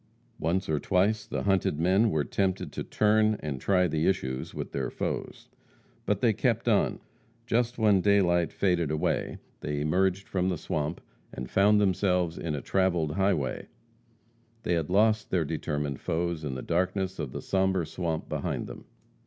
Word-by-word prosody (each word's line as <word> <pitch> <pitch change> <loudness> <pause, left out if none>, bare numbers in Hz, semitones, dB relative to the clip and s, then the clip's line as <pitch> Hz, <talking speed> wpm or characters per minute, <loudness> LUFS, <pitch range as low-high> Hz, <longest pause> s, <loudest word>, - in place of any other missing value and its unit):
Once 90 +4 0
or 75 -2 0
twice 100 +5 +1
the - - -3
hunted 95 -6 +1
men 95 +7 +3
were 80 -6 +1
tempted 95 +7 -1
to - - -4
turn 110 0 +2
and 70 -4 -5
try 90 -2 +3
the 80 0 0
issues 65 -9 -1
with - - -6
their - - -2
foes. - - -4 0.6
But - - +1
they - - +4
kept - - 0
on. - - +2 0.5
Just 120 +1 0
when 105 -4 +4
daylight 90 -4 +3
faded 90 -5 +1
away, 75 0 -1 0.2
they 75 0 -3
emerged 95 +5 +1
from 95 -1 0
the 90 - -1
swamp, 75 +2 -3 0.3
and 65 0 -7
found 105 +2 +4
themselves 90 -3 +1
in 80 -3 -2
a 70 - -4
travelled 90 -5 +1
highway. 85 -7 0 1.0
They 90 - 0
had 80 -2 -1
lost 110 +3 +3
their 85 -4 +1
determined 75 -3 -3
foes 85 -1 -2
in 70 -3 -3
the 65 - -5
darkness 95 +2 -1
of 75 -5 -3
the - - -5
sombre 95 -2 +1
swamp 80 -1 -3
behind - - -3
them. - - -10
90 Hz, 165 wpm, -28 LUFS, 75-95 Hz, 1.0 s, they